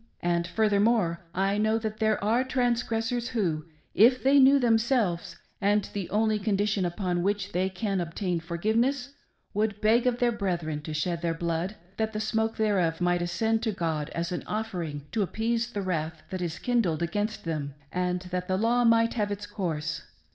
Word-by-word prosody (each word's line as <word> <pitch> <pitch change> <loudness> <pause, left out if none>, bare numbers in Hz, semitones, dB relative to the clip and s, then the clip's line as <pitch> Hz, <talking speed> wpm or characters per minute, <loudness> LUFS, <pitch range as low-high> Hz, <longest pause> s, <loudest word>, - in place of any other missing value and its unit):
And, 170 0 +1
furthermore, 205 -3 +2
I 195 +2 +1
know 220 +1 +2
that 220 -1 -4
there 215 -2 +1
are 230 +5 +3
transgressors 240 -2 0
who, 170 -10 -1 0.3
if 250 +4 +5
they 275 +2 +6
knew 270 +1 +7
themselves, 225 -8 +1 0.3
and 205 0 +2
the 200 -4 -4
only 215 0 +2
condition 205 -1 +1
upon 175 0 -1
which 200 +1 -1
they 185 +2 0
can 195 0 -2
obtain 175 +1 -2
forgiveness, 230 - 0 0.4
would 210 0 0
beg 230 +4 +3
of 245 -1 +2
their 245 -1 +2
brethren 175 -9 -2
to 155 - -4
shed 170 +2 -1
their 165 -1 0
blood, 170 +4 -2 0.2
that 220 0 -1
the 215 - -2
smoke 220 +1 0
thereof 185 -7 +1
might 175 0 +2
ascend 220 +6 0
to 225 -2 0
God 160 -5 -2
as 170 +1 -2
an 180 - -2
offering 175 -10 -3
to 225 - 0
appease 230 +4 -1
the 200 -3 -3
wrath 160 -3 -3
that 185 -1 -3
is 170 -2 -3
kindled 205 -10 +1
against 205 +5 -2
them, 150 -4 -3 0.2
and 180 0 -1
th'i.t 180 0 -11 0.2
the 185 - +1
K;w 240 +3 +2
might 230 0 +4
have 210 -3 -1
its 205 0 -4
course. 160 -6 -3
205 Hz, 175 wpm, -27 LUFS, 175-225 Hz, 0.4 s, knew